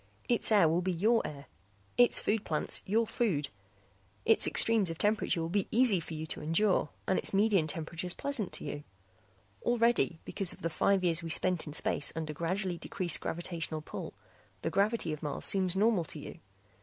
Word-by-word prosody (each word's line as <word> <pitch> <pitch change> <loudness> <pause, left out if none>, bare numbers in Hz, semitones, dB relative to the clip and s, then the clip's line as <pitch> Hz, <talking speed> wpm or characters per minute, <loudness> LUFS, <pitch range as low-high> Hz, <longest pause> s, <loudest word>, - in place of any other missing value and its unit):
Its 240 -2 0
air 205 -6 +6
will 165 +3 +1
be 185 +1 -1
your 215 +7 +2
air; 140 -1 -9 0.5
its 245 0 +5
food 215 0 0
plants 155 -2 -2
your 225 +4 +2
food. 180 - -1 0.8
Its 225 - +5
extremes 220 -5 +4
of 165 - -5
temperature 210 -3 +1
will 165 - -1
be 195 +3 -1
easy 230 -5 +4
for 165 -1 -7
you 155 +1 -4
to - - -2
endure 165 +1 +2 0.2
and 190 - +1
its - - -2
median 200 -5 +3
temperatures 165 +3 -4
pleasant 275 -9 -3
to - - -3
you. 145 - -5 0.8
Already, 235 -7 +2
because 195 -3 0
of - - -16
the 165 - -1
five 190 +4 +2
years 170 -2 +3
we 165 - -6
spent 180 +1 0
in 150 - -6
space 145 - 0
under 160 -2 -4
gradually 175 +3 -2
decreased 180 -4 -1
gravitational 165 -2 -3
pull, - - -7 0.5
the - - -1
gravity 205 -4 +1
of 155 - -7
Mars 150 -2 -3
seems 185 -2 +2
normal 205 -3 +2
to 155 - -8
you. 145 - -9
180 Hz, 185 wpm, -31 LUFS, 160-210 Hz, 0.8 s, air